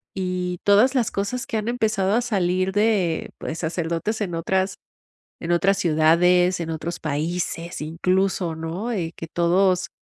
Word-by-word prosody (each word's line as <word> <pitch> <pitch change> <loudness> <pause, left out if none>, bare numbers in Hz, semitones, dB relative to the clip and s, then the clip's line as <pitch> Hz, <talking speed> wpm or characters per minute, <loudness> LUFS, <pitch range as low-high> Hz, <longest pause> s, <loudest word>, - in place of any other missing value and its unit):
Y 180 -1 -2
todas 215 +7 +4
las 240 -4 +1
cosas 240 +6 -2
que 225 - -3
han 215 +1 -3
empezado 215 -5 0
a 245 - +3
salir 185 -5 0
de 205 -5 +1
pues, 160 - -5
sacerdotes, 170 +5 -2
en 180 -4 -2
otras 190 +3 0 0.7
en 170 - -2
otras 195 +3 +3
ciudades, 175 +2 +3
en 165 - -4
otros 165 +1 -4
países, 165 +3 -3
incluso, 180 +2 0
¿no? 165 +9 -4
Eh, 175 -7 -2
que 165 - -6
todos, 180 +2 +2
180 Hz, 150 wpm, -23 LUFS, 165-200 Hz, 0.7 s, todas